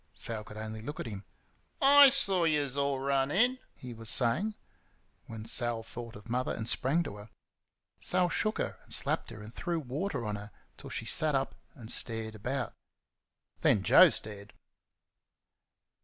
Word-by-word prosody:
Sal 110 -2 -3
could 105 0 -11
only 110 0 -6
look 145 +7 -7
at - - -4
him. 100 -3 -7 0.5
"I 280 0 +8
saw 190 -7 +3
yuz 150 -4 +1
all 140 -1 0
run 135 0 +1
in," 245 - +2 0.2
he 125 -2 -9
was 115 -1 -5
saying, 130 - +1 0.7
when 110 -1 -8
Sal 120 -1 0
thought 115 0 -9
of 105 +1 -12
Mother, 125 +2 -1
and 110 - -5
sprang 145 +9 +2
to 105 - -7
her. 105 +2 -12 0.7
Sal 180 -1 +3
shook 215 +5 0
her, - - -3
and - - -20
slapped - - 0
her, 110 -2 -10
and 110 +2 -11
threw 170 +3 -2
water 140 - -3
on 105 -1 -3
her 105 +1 -9 0.3
till - - -11
she - - -4
sat 155 -2 +2
up 135 0 -1 0.2
and 115 -3 -5
stared 110 -1 -3
about. 125 +5 -3 0.9
Then 100 - +3
Joe - - +8
stared. 100 -1 -3
120 Hz, 170 wpm, -30 LUFS, 110-150 Hz, 0.9 s, I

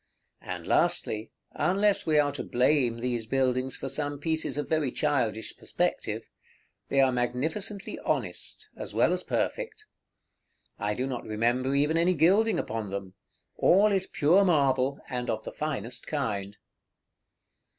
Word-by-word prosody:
And - - -6
lastly 110 +1 +1 0.2
(unless 195 +6 +2
we 155 -1 +3
are 145 -1 +4
to 140 - -5
blame 125 -2 +2
these 120 -3 -2
buildings 130 0 +1
for - - -5
some 145 +2 -2
pieces 160 +1 -1
of 150 - -2
very 155 -5 +1
childish 125 -8 -1
perspective), - - -2 0.6
they 135 - +2
are 135 -1 +4
magnificently 155 - -2
honest, - - -2
as - - -5
well - - +4
as - - -1
perfect. 455 -3 -2 0.9
I 105 -1 -1
do 125 - -1
not 130 -3 -4
remember 120 +5 0
even 150 +3 +2
any 175 +2 +3
gilding 195 +8 +4
upon 110 -2 -3
them; 95 -1 -5 0.4
all 205 +4 +5
is 190 -1 +1
pure 175 +7 +4
marble, 140 -6 +2
and 125 -1 -3
of 110 -1 -2
the - - -6
finest 130 -7 -4
kind. 105 -9 -3
135 Hz, 140 wpm, -28 LUFS, 120-160 Hz, 0.9 s, all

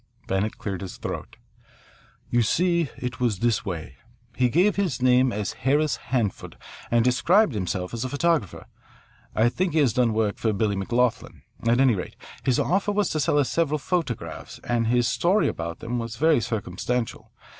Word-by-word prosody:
Bennett 95 +3 -1
cleared 95 -3 -4
his 95 -2 -7
throat. - - -6 0.9
"You 120 - +3
see, 170 - +1
it 125 0 -5
was 120 -5 +1
this 115 +2 +1
way. 80 -8 -6 0.4
He 125 -1 +2
gave 180 - +3
his 190 -10 -1
name 125 0 +4
as 105 -2 -3
Harris 145 +3 +1
Hanford 115 -7 -3 0.3
and 120 0 +3
described 170 - +3
himself 90 -2 -3
as 115 +1 -3
a 130 - -3
photographer. 145 - 0 0.7
I 110 +2 +4
think 175 +7 -1
he 160 - +3
has 130 -7 +3
done 120 -1 +2
work 110 -2 0
for 110 -2 +1
Billy 100 0 0
McLoughlin. 120 +5 -1 0.2
At 120 +2 +3
any 130 -3 +5
rate, 90 -4 -5 0.3
his 130 -3 +2
offer 195 +3 +1
was 205 -1 +1
to 155 - -1
sell 145 +1 +2
us 145 -3 +2
several 155 -3 +1
photographs, 125 - -3
and 115 -1 0
his 120 0 +2
story 190 +5 +2
about 85 0 -4
them 120 +1 -3
was 115 -1 -5
very 155 -2 +3
circumstantial. 115 +3 -3
120 Hz, 175 wpm, -25 LUFS, 105-150 Hz, 0.9 s, any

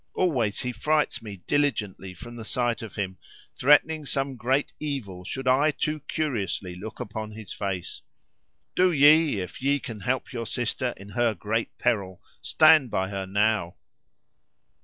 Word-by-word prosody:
Always 120 - +1
he 125 - -2
frights 150 +3 0
me 100 -5 -9
diligently 105 -10 -1
from 120 +6 -10
the 115 - -7
sight 120 +1 0
of 110 -3 -8
him, 95 -2 -3 0.4
threatening 150 +2 +4
some 135 -1 -1
great 130 +4 0
evil 120 -12 -4
should 130 +7 -5
I 135 +4 +4
too 155 +1 -1
curiously 110 - -2
look 100 +5 -8
upon 110 +1 -5
his 110 -1 -7
face. 95 -3 -4 0.7
Do 185 0 +4
ye, 150 - +5
if 90 - -8
ye 140 +2 +2
can 115 -4 -7
help 130 +5 -2
your 115 -2 -4
sister 125 +1 -1
in 100 +1 -11
her 115 +2 +1
great 110 +4 -2
peril, 95 -5 0 0.2
stand 155 -6 +5
by 95 -2 -1
her 95 -1 -4
now." 105 -3 +1
115 Hz, 155 wpm, -26 LUFS, 100-140 Hz, 0.7 s, ye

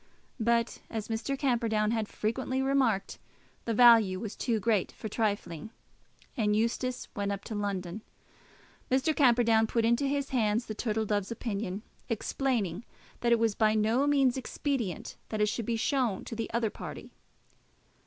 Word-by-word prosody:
But, 235 0 +1
as 220 -1 -4
Mr. 230 +5 -2
Camperdown 230 -5 +1
had 220 -2 -1
frequently 260 +6 -2
remarked, 265 -7 +1 0.5
the 230 - 0
value 225 -6 +6
was 215 0 -5
too 230 -3 0
great 210 -3 +1
for 220 - -7
trifling, 205 -6 -2 0.7
and 210 -3 +1
Eustace 235 +3 -1
went 200 -2 -1
up 200 0 -4
to - - -6
London. 200 -2 -3 0.9
Mr. 270 +4 +2
Camperdown 230 -4 +4
put 230 0 +1
into 235 +5 +2
his 280 0 -1
hands 225 -2 +1
the 215 - -5
Turtle 220 0 -1
Dove's 205 -2 -1
opinion, 210 -3 -3 0.3
explaining 225 -4 -1 0.4
that 235 - +1
it 235 - +6
was 225 -2 +2
by 215 0 +2
no 225 +6 +2
means 270 -3 +3
expedient 260 - -3
that 215 - -3
it 210 0 +3
should 225 0 -3
be 230 -1 0
shown 245 -4 0
to - - -6
the 225 0 -3
other 230 -2 0
party. - - -8
225 Hz, 155 wpm, -30 LUFS, 210-245 Hz, 0.9 s, value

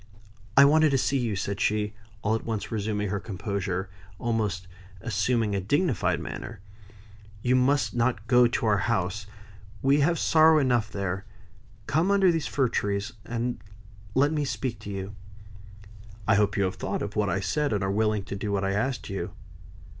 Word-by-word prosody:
"I 140 - +10
wanted 155 +2 +5
to 135 - +2
see 135 +1 +1
you," 115 -4 -1
said 100 +1 -3
she, 105 0 +1 0.3
all 105 - +2
at 115 - -1
once 110 -3 -4
resuming 105 -2 -1
her 100 +1 -1
composure, 100 -2 -3
and 95 - -17 0.3
almost 105 -6 -1 0.3
assuming 115 +1 0
a 100 - 0
dignified 145 - +1
manner. 115 -3 -7 0.8
"You 125 +1 +3
must 135 +3 +2
not 120 -3 0
go 125 0 +5
down - - -7
to - - 0
our 105 -2 +3
house; 100 -1 -1 0.6
we 140 +2 +4
have 165 +4 +3
sorrow 160 0 +5
enough 120 -6 +2
there. 95 0 -3 0.6
Come 160 +6 +1
under 195 -2 +5
these 165 -3 -1
fir 135 -3 +1
trees, 100 +2 -1
and 120 +1 -3 0.5
let 145 +3 +4
me 150 -1 0
speak 130 -3 -3
to - - -9
you." 95 0 -5 1.1
"I 110 - +5
hope 100 0 +2
you 100 - +2
have 95 -1 -1
thought - - -2
of 105 - -5
what 105 -2 +1
I 95 - 0
said, 145 +8 0
and 105 -2 0
are 95 - 0
willing 105 0 +1
to 100 - -6
do 100 +1 -3
what 100 -1 0
I 95 - 0
asked 120 +6 -1
you." 95 - -4
110 Hz, 185 wpm, -27 LUFS, 100-130 Hz, 1.1 s, I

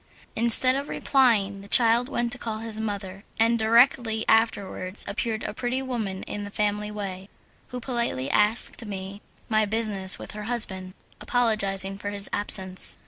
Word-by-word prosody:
Instead 235 +3 +3
of 280 +1 -4
replying, 215 -7 +2
the 200 - -12
child 235 +3 +4
went 240 -3 -1
to 245 - 0
call 220 -2 -3
his 220 -1 -4
mother, 200 -3 -5 0.2
and 230 +1 +3
directly 225 0 +3
afterwards 205 -3 0
appeared 220 +2 -3
a - - -4
pretty 245 +3 -2
woman 225 -8 -4
in 205 - -6
the 205 - -6
family 210 0 -1
way, 195 -2 -6 0.4
who 250 - -6
politely 235 - -2
asked 210 +3 +2
me 200 -1 -7 0.3
my 215 -1 +2
business 210 -3 +1
with - - -9
her 210 0 -7
husband, 190 -5 -2 0.2
apologizing 200 -5 0
for 205 - -4
his 200 -1 -3
absence. 190 -2 +2
215 Hz, 155 wpm, -25 LUFS, 200-235 Hz, 0.4 s, child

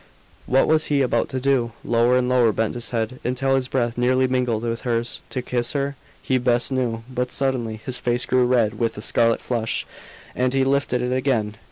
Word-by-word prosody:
What 135 +1 +4
was 155 -1 +3
he 140 -2 +2
about 120 -2 0
to 130 - -3
do? 130 -3 +1
Lower 120 +2 +3
and 125 -1 +1
lower 125 -3 +4
bent 110 +1 -1
his 120 -1 -5
head, 115 +1 -2
until 135 +2 +1
his 130 -1 0
breath 120 -2 -1
nearly 130 +1 +3
mingled 125 -3 0
with 115 0 -2
hers. 120 -1 -2
To 125 - -4
kiss 120 -1 -1
her? 140 0 -1 0.3
He 130 -1 +1
best 120 +1 +1
knew. 120 -4 -1
But, 125 -1 -3
suddenly, 130 -5 -1
his 125 -1 -2
face 120 0 0
grew 125 -1 +2
red 120 -4 +1
with 115 -2 -1
a - - -5
scarlet 115 0 +2
flush, 115 -2 -2 0.5
and 125 +1 0
he 135 - +3
lifted 135 -2 +1
it 125 +1 -1
again. 120 -5 0
125 Hz, 205 wpm, -22 LUFS, 115-130 Hz, 0.5 s, What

